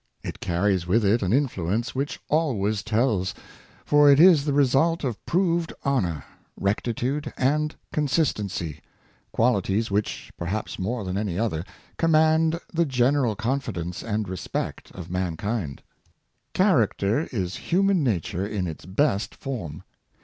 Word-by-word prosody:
It - - -6
carries 90 0 0
with 105 +4 +3
it 110 +4 +3
an 95 -2 0
influence 115 - 0
which 135 +2 -3
always 110 -10 +1
tells; 110 -4 0 0.5
for 145 -1 +6
it 140 - +5
is 165 -4 +7
the 145 - +1
result 145 +5 +3
of 125 -6 -3
proved 170 -2 +1
honor, 90 - 0 0.4
recti 100 +4 0
tude, 140 +6 -2
and 150 +4 +1 0.2
consistency 105 - -1 0.3
— - - -37
qualities 110 -2 +1
which, 105 +1 -2
perhaps 95 +5 -3
more 110 +4 -2
than 95 +1 -2
any 100 -5 -2
other, 95 -8 -1 0.4
command 160 0 +3
the 170 0 +2
general 130 -2 +2
confidence 105 -8 -3
and 110 -2 -2
respect 95 -1 -4
of 85 -2 -8
mankind. 90 - -3 0.7
Character 130 - +2
is 95 -6 -2
human 190 -1 +3
nature 95 - -1
in 100 -3 -2
its 80 0 -7
best 100 +1 0
form. 105 - -6
115 Hz, 135 wpm, -25 LUFS, 95-145 Hz, 0.7 s, is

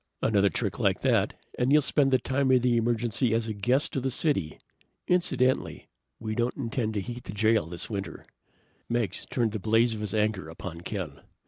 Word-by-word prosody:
"Another 100 -2 +3
trick - - -3
like - - +1
that - - +2 0.2
and 125 +2 +2
you'll 150 0 +5
spend 140 -1 +2
the 130 - +4
time 130 +2 0
of 130 -2 +4
the 125 -1 +3
emergency 115 0 +1
as 115 0 0
a 110 - -2
guest 125 +8 +1
of 135 - 0
the 135 - -1
city. 125 - 0 0.5
Incidentally, 135 -8 +1 0.3
we 110 -1 -4
don't 120 +2 -1
intend 115 -4 -2
to 100 - 0
heat 120 +4 -7
the - - -6
jail 110 -4 +2
this 85 0 -4
winter!" 100 -3 -6 0.6
Meggs 115 -6 -2
turned 115 -3 0
the 110 - -4
blaze 115 +3 +3
of 110 - -5
his 105 -1 -3
anger 105 -6 0
upon 85 0 -8
Ken. 85 -7 -5
115 Hz, 195 wpm, -27 LUFS, 105-125 Hz, 0.6 s, you'll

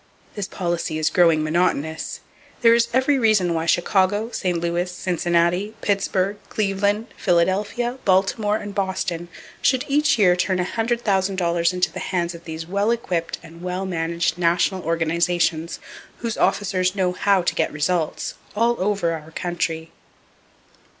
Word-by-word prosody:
This 205 -3 -4
policy 170 -3 -2
is 155 - +1
growing 165 -3 +4
monotonous. 160 -1 -1 0.4
There 230 0 +7
is 235 0 +3
every 265 +2 +2
reason 210 -7 +3
why 165 0 -2
Chicago, 200 +6 +2
St. 180 -6 -1
Louis, 170 +1 -1
Cincinnati, 175 +3 0
Pittsburgh, 200 0 0
Cleveland, 205 +2 0
Philadelphia, 200 +8 0
Baltimore 200 +2 +2
and 205 -2 -7
Boston 190 -3 -2 0.3
should 260 +1 +2
each 295 0 +3
year 180 -5 +5
turn 185 +1 0
$100,000 190 -5 0
into 180 0 0
the - - -6
hands 175 -2 -2
of 170 0 -12
these 160 0 -6
well 200 +5 0
equipped 180 -8 -1
and 165 +1 -13
well 180 +1 -3
managed 170 -1 -1
national 175 +2 +2
organizations 165 0 0 0.4
whose 230 -2 -3
officers 185 -2 +1
know 185 -2 +1
how 190 0 +2
to - - 0
get - - 0
results, 155 +2 -1 0.2
all 235 +2 +2
over 195 -3 +1
our 160 -1 -6
country. 165 -1 -3
180 Hz, 135 wpm, -22 LUFS, 170-205 Hz, 0.4 s, There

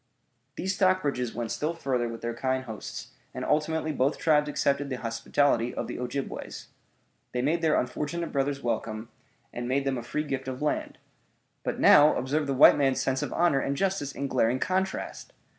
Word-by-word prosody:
These 190 +1 -1
Stockbridges 150 - +1
went 120 -1 -3
still 160 +3 -2
further 125 -6 -1
with 115 0 -7
their 120 0 -3
kind 130 +2 -1
hosts, 110 -4 -7 0.3
and - - -3
ultimately 155 +1 0
both 140 0 +1
tribes 150 -2 +3
accepted 140 -1 0
the 130 - -2
hospitality 120 +1 0
of - - -2
the - - -6
Ojibways. 130 +2 -5 0.6
They 125 0 -1
made 165 +5 +1
their 160 -2 +3
unfortunate 150 +7 -3
brothers 140 0 -1
welcome, 110 -1 -3 0.4
and 120 0 -4
made 135 +1 +1
them 135 -2 0
a - - -5
free 135 +6 -3
gift 135 -3 -4
of 130 -1 -4
land. 150 0 -2 0.7
But - - -3
now 150 +1 +7
observe 145 +4 -1
the 135 - 0
white 130 - +7
man's 135 -2 +2
sense 130 0 0
of - - -3
honor 170 -5 +3
and 140 +1 -2
justice 190 -7 0
in 140 - -4
glaring 125 -2 +2
contrast! 190 - -2
140 Hz, 180 wpm, -27 LUFS, 125-150 Hz, 0.7 s, now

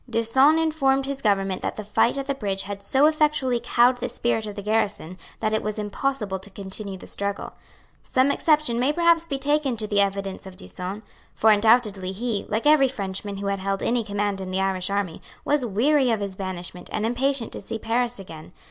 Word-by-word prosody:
D'Usson 265 +7 +4
informed 275 -4 +2
his 275 0 -4
government 195 -3 +1
that - - -3
the 215 - -5
fight 220 +5 +2
at 275 - -2
the 275 - -1
bridge 200 -7 -2
had 200 0 -6
so 265 +8 +3
effectually 300 -5 +2
cowed 245 +1 +4
the 245 0 -3
spirit 235 -2 -1
of 205 - -6
the 200 - -6
garrison 210 -5 0 0.3
that 215 -1 0
it 220 - +1
was 215 0 -3
impossible 210 -1 -2
to 190 - -10
continue 195 0 -7
the - - -12
struggle. 200 0 -4 0.5
Some 260 +2 +2
exception 300 -6 +2
may 260 +4 +3
perhaps 335 0 +3
be 280 -4 -2
taken 285 -2 0
to 215 - -1
the 205 -1 +2
evidence 195 -1 -2
of 185 -1 -11
D'Usson; 195 +2 -6 0.3
for 220 - +5
undoubtedly 210 -3 +3
he, 220 0 -3
like 220 +5 -1
every 295 -2 +6
Frenchman 200 -4 -4
who 200 - -5
had 200 0 -1
held 195 +1 -2
any 240 0 +1
command 205 -1 -2
in 185 - -5
the 185 +1 -1
Irish 190 -1 0
army, 200 -4 -2 0.2
was 285 -4 +1
weary 260 +6 +3
of 225 -2 +1
his 200 -2 -4
banishment, 185 -2 -6
and 215 - -1
impatient 250 +1 0
to - - -7
see 215 +3 -5
Paris 240 +2 -1
again. 170 -3 -10
215 Hz, 205 wpm, -24 LUFS, 195-265 Hz, 0.5 s, every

